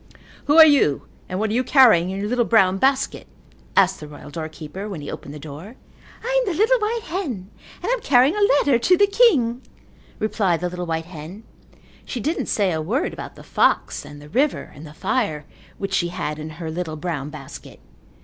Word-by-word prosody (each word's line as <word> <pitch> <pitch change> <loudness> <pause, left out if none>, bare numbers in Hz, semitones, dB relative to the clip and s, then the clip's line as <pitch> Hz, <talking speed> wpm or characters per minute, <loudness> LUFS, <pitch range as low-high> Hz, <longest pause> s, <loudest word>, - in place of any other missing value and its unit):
"Who 290 +2 +3
are 320 - +11
you 275 - +3 0.3
and 185 - -3
what 215 +1 -1
are - - -1
you 250 +2 +1
carrying 230 - +5
in 190 - -4
your 205 - -2
little 245 +2 +1
brown 195 -5 +3
basket?" 270 +3 0 0.5
asked 190 -1 +4
the 150 - -9
royal 145 0 -12
doorkeeper 160 +5 -7
when 190 -6 -6
he 145 - -7
opened - - -8
the 150 - -8
door. 155 - -10 0.5
"I - - 0
am 410 - -1
the 325 - -4
little 485 +4 +4
white 445 +1 -1
hen 265 - -5 0.3
and - - -4
I - - -1
am - - 0
carrying 270 +3 +4
a 420 - -1 0.2
letter 275 -5 +3
to 360 +9 +4
the 405 - +6
king," 350 - +3 0.6
replied 200 -5 0
the 180 - -1
little 180 -1 -5
white 160 0 -2
hen. 170 +5 -10 0.6
She 250 - -5
didn't 305 +8 -2
say 200 -3 +1
a 160 -1 -1
word 235 - -1
about - - -8
the - - -13
fox - - +1
and 145 - -11
the 150 0 -13
river 270 - 0
and 155 +2 -11
the 150 - -12
fire 195 - -1 0.3
which 195 - -4
she 175 - +1
had 150 -3 -4
in 155 +1 -6
her 165 -2 -5
little 160 -1 -4
brown 155 -3 -4
basket. 150 -3 -11
195 Hz, 210 wpm, -22 LUFS, -, 0.6 s, are